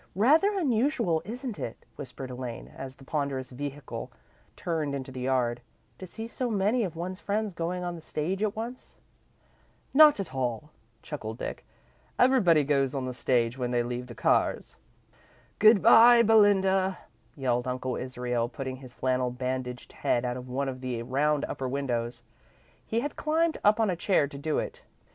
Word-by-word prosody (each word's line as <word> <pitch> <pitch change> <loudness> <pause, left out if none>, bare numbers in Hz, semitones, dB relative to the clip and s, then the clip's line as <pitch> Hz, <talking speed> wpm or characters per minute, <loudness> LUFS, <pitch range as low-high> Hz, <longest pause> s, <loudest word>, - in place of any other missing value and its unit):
"Rather 315 - +4
unusual, 240 - +1
isn't 240 +1 -6
it?" 115 - -6
whispered 130 0 -8
Elaine, 125 -2 -6
as 135 0 -8
the 135 - -16
ponderous 135 -2 -3
vehicle 140 +1 -6 0.4
turned 155 -5 -2
into 130 -1 -6
the 130 - -7
yard, 125 -2 0 0.4
"to 185 - -7
see 225 +5 -7
so 245 +2 -3
many 215 +3 +1
of 175 -5 -4
one's 180 +3 -5
friends 205 0 -2
going 175 +2 -3
on 175 0 -3
the 170 - -9
stage 165 +5 -3
at 215 -2 0
once?" 235 +3 -7 1.0
"Not 300 -3 +7
at 185 -9 -5
all," 130 +2 -3 0.3
chuckled 110 -7 -6
Dick. - - -5 0.5
"Everybody 210 - +5
goes 140 -2 +1
on 135 -2 -2
the 130 - -4
stage 120 0 0
when 125 -1 -1
they 120 -1 +1
leave 120 +1 -4
the 120 - -10
Carrs." - - +1 0.8
"Good 215 -2 +6
bye, 235 +1 +8
Belinda," 195 -3 +4 0.4
yelled 125 -3 0
Uncle 130 0 -2
Israel, 125 -2 -2
putting 130 0 -5
his 130 -2 -13
flannel 130 -1 0
bandaged 125 0 -4
head 120 +1 0
out 125 0 -2
of 125 0 -8
one 135 +2 -1
of 130 -1 -5
the 125 -3 -3
round 145 +4 +1
upper 130 -1 -4
windows. 125 -3 -2 0.6
He 230 +1 -1
had 290 +3 -4
climbed 320 +2 0
up 210 +2 +4
on 220 -4 +2
a - - -1
chair 170 -4 +2
to 140 - -10
do 155 +1 -1
it. - - -4
145 Hz, 170 wpm, -28 LUFS, 125-205 Hz, 1.0 s, bye